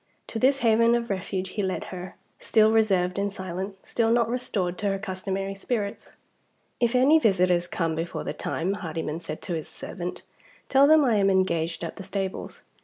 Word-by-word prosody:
To 225 - -4
this 270 +2 +3
haven 230 +1 +5
of 235 -2 -2
refuge 190 0 -3
he 205 - -3
led 190 -1 -2
her 180 0 -7 0.2
still 220 0 +4
reserved 195 -4 +2
and 200 0 0
silent, 190 +1 -5
still 230 -1 +1
not 230 -1 +3
restored 195 -8 -1
to 205 - -1
her 195 0 +1
customary 195 0 -3
spirits. 200 0 -4 0.7
"If 240 0 +2
any 280 +6 +6
visitors 180 - +2
come 165 -2 -1
before 165 +2 -3
the - - -3
time," 180 +4 -2
Hardyman 160 -4 -4
said 160 -2 -7
to 180 - -3
his 160 -2 -3
servant, 180 -2 -6 0.5
"tell 275 +1 +6
them 310 -1 +6
I 230 -4 +3
am 195 -1 +3
engaged 170 -3 +1
at 165 - -5
the - - -7
stables. 195 0 -5
195 Hz, 180 wpm, -26 LUFS, 180-225 Hz, 0.7 s, any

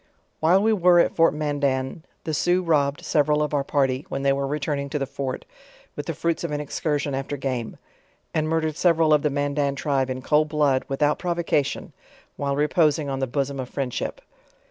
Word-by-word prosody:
While 180 +5 +4
we 220 - +3
wre 180 -4 +5
at - - -5
fortMandan, 145 -3 +1 0.2
the 160 - -3
Sioux 175 +4 +2
robbed 145 -4 +1
several 150 0 +2
of 150 - -3
our 140 -1 +1
party 135 -1 0
when 135 - -3
they 140 0 +3
were 140 0 -1
returning 140 -1 -2
to 150 - -2
the 140 - -1
fort, 135 -1 -5 0.5
with 145 - -6
the 165 - -3
fruits 170 +1 -1
of 170 - -2
an 150 0 -2
excursion 145 0 -2
after 135 +2 -3
game; 130 -4 -3 0.6
and 155 0 0
murdered 160 -1 0
several 165 -3 +4
of 150 - +4
the 150 - +1
Mandan 145 0 0
tribe 135 -2 0
in 130 0 -4
cold 155 0 +2
blood, 145 -4 +2
without 145 +2 +1
provocation, 170 -5 -1 0.4
while 140 -1 -1
reposing 150 0 +2
on 135 -1 -2
the 135 - -1
bosom 140 +1 -2
of 130 -1 -5
friendship. 135 -3 -3
145 Hz, 190 wpm, -24 LUFS, 140-155 Hz, 0.6 s, wre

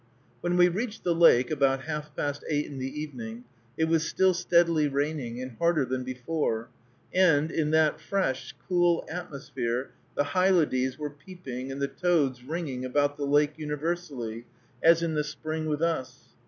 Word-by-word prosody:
When 175 0 0
we 175 0 +7
reached 215 +5 -3
the 175 - +2
lake, 145 -7 +5
about 135 -3 +2
half 150 -1 -5
past 145 0 -2
eight 150 -1 +1
in 140 -2 -7
the 135 +3 -4
evening, 120 -6 -7 0.3
it 160 - +3
was 160 -1 +2
still 190 0 +3
steadily 170 -3 +3
raining, 140 -4 -2
and 130 -2 -6
harder 170 -4 +3
than 130 0 -2
before; 125 -2 -2 0.4
and, 165 -5 +4
in 155 -2 0
that 155 -1 +3
fresh, 185 -10 -1
cool 175 -2 +2
atmosphere, 135 -7 -4 0.2
the - - +2
hylodes 150 -7 +2
were 150 -1 -4
peeping 145 -5 -8
and 135 - -5
the 140 - +1
toads 145 -8 +1
ringing 140 -3 -4
about 145 +3 +1
the 145 -1 -3
lake 145 +1 +3
universally, 150 -7 -4 0.4
as 165 0 +5
in 165 -1 0
the 150 -1 +1
spring 155 +1 -4
with 150 +1 -1
us. 130 -6 -2
150 Hz, 165 wpm, -28 LUFS, 130-170 Hz, 0.4 s, we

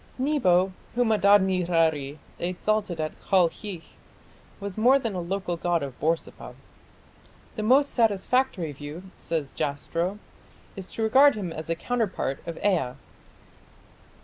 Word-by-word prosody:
Nebo, 195 -10 +2 0.2
whom 240 -2 +2
Adad 205 -1 +5
nirari 165 -6 +1 0.2
exalted 185 0 -1
at 155 0 -4
Kalkhi, 185 -1 0 0.8
was 200 -2 -6
more 245 +5 +5
than 230 -6 -3
a 180 - -3
local 180 0 -3
god 170 -2 0
of 135 -3 -7
Borsippa. 165 +2 -2 1.0
"The 215 - -3
most 265 +6 +4
satisfactory 225 - +1
view", 145 +5 -8 0.2
says 155 -5 -3
Jastrow, 165 +7 -2 0.6
"is 190 -2 -7
to 225 - -2
regard 270 +5 +6
him 185 -6 -4
as 160 0 -7
a 165 - +1
counterpart 205 - -2
of 170 - -5
Ea. 165 -11 +1
185 Hz, 125 wpm, -26 LUFS, 165-215 Hz, 1.0 s, regard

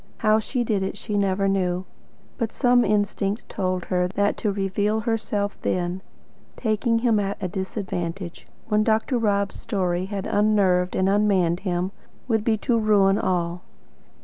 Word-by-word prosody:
How 215 0 +3
she 245 +3 -2
did 215 -4 0
it 190 - -3
she 210 - -4
never 195 -1 +1
knew. 185 -2 0 0.5
But 230 -3 -1
some 245 -2 +3
instinct 205 0 0
told 185 -2 -2
her 180 -1 +1
that 200 +2 0
to 210 - 0
reveal 205 +2 0
herself 210 -2 -2
then, 180 +1 -1 0.5
taking 230 +1 +1
him 225 -3 +4
at 200 0 -2
a 185 - -2
disadvantage, 185 -2 -4 0.2
when 215 -1 +2
Dr. 225 +3 +1
Rob's 200 -3 0
story 180 -2 -1
had 195 0 -4
unnerved 195 -4 +2
and 185 - +2
unmanned 195 -4 +2
him, 185 -1 -2 0.4
would 220 -3 +1
be 220 -1 +2
to 230 +1 +1
ruin 205 -2 +4
all. 175 -1 -1
200 Hz, 150 wpm, -24 LUFS, 185-215 Hz, 0.5 s, him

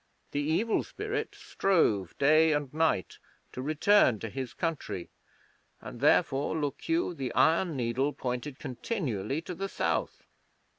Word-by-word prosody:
The 145 - -1
Evil 165 +10 +1
Spirit - - -4
strove 110 - +1
day 155 +3 +5
and 145 -2 -2
night 155 - 0 0.3
to 130 - -6
return 155 - +4
to 115 - -4
his 130 -3 -4
country, 150 - -3 0.7
and - - -9
therefore, 140 +4 +3
look 145 - -4
you, 330 - +1
the 135 -6 -4
iron 165 0 +3
needle 125 +4 0
pointed 130 +1 -4
continually 135 - -3
to 180 - -6
the 195 +3 -4
South.' - - -2
145 Hz, 135 wpm, -29 LUFS, 130-165 Hz, 0.7 s, day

